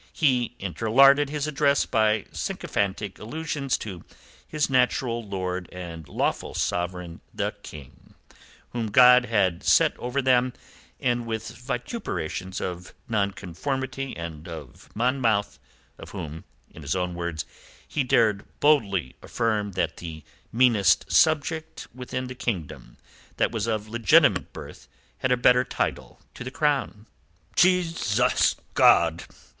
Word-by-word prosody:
He 125 -6 +1
interlarded 135 - +4
his 150 -1 -2
address 145 -1 +2
by 110 -1 +1
sycophantic 100 0 -3
allusions 145 +2 -2
to 95 -6 -8 0.4
his 150 -1 0
natural 125 -2 +1
lord 95 -3 -4
and 85 -3 -8
lawful - - -2
sovereign, 90 -1 -3
the - - -2
King, 75 -4 -13 0.6
whom 115 -2 -2
God 125 +3 +7
had 100 -7 +1
set - - +4
over 125 +3 -2
them, 125 -1 +3 0.5
and 120 -1 0
with 110 -1 -4
vituperations 120 - -4
of 90 0 -6
Nonconformity 130 - -3
and 85 -2 -7
of 80 -7 -10
Monmouth, 115 -3 +1 0.4
of - - -10
whom 80 0 -7 0.3
in - - -12
his - - -2
own 90 -1 -1
words 85 -2 -4 0.4
he 150 - -1
dared 110 -5 +2 0.2
boldly 100 - +2
affirm 105 -4 -1
that 95 - -1
the 80 -2 -8 0.3
meanest 110 -9 +3
subject 160 - +1
within 125 +1 -5
the 130 - -6
kingdom 80 - -5 0.4
that - - +1
was 115 -2 -2
of 110 -2 -2
legitimate 115 -3 +3
birth - - -11 0.3
had 130 - 0
a 125 - +4
better 125 +1 +5
title - - -3
to - - -8
the 130 - -5
crown. 135 -7 -1 0.5
"Jesus 170 - +3 0.2
God! 85 -1 +4
115 Hz, 125 wpm, -25 LUFS, 90-130 Hz, 0.6 s, God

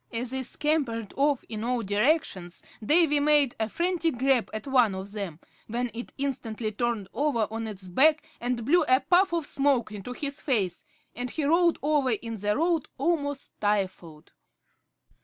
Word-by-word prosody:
As 240 +1 -3
they 265 0 -1
scampered 255 -5 -1
off 285 -1 +2
in 220 -1 -5
all 245 0 0
directions 205 - 0 0.2
Davy 300 +3 +4
made 290 -3 +3
a 220 0 0
frantic 340 - 0
grab 260 -2 +2
at 215 -1 -5
one 250 -7 +3
of 190 +1 -6
them, 195 -7 -5 0.3
when 240 +2 -2
it 240 +1 -7
instantly 235 -5 -3
turned 225 -2 -2
over 275 -7 +1
on 225 0 -4
its 195 -3 -8
back 305 - +4
and 240 -1 -2
blew 345 +7 +4
a 255 +2 +4
puff 360 +6 +3
of 335 -3 -1
smoke 275 -6 +1
into 210 +4 -6
his 280 +2 -4
face, 200 - -1 0.3
and 245 +1 -3
he 310 - -3
rolled 335 +3 +3
over 290 -3 +2
in 230 0 -3
the 210 +1 0
road, 330 -1 +1
almost 285 -2 -1
stifled. 185 -6 -2
250 Hz, 165 wpm, -27 LUFS, 215-290 Hz, 0.3 s, Davy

